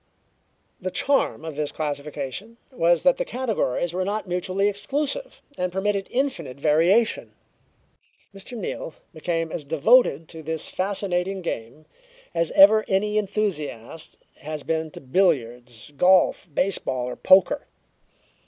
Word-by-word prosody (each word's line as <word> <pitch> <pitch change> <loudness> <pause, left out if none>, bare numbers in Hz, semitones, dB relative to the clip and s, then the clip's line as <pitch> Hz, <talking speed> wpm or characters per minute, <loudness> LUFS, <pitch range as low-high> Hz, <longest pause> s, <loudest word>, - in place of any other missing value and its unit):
The 185 - -3
charm 275 - 0
of 160 -2 -6
this 150 0 -2
classification 150 - -5
was 175 -8 +2
that 270 -1 +4
the - - 0
categories 220 - -2
were 185 +1 -1
not 205 +2 -3
mutually 185 +2 0
exclusive, 285 - -3 0.2
and 180 0 -1
permitted 195 +1 -1
infinite 170 - -2
variation. 170 +10 +2 1.0
Mr. 200 +5 -9
Neal 175 -5 -5 0.2
became 165 0 -2
as 155 - -4
devoted 160 - +3
to 160 -1 -8
this 160 0 -3
fascinating 190 -1 -2
game 135 0 -5 0.5
as 165 -1 0
ever 215 +3 +7
any 210 +2 +1
enthusiast 165 - -4 0.2
has 155 -1 -6
been 160 -1 -1
to - - -11
billiards, 125 - -1
golf, 180 +2 +3
baseball 140 -7 0
or 125 - -5
poker. 190 +9 +4
180 Hz, 125 wpm, -24 LUFS, 155-205 Hz, 1.0 s, ever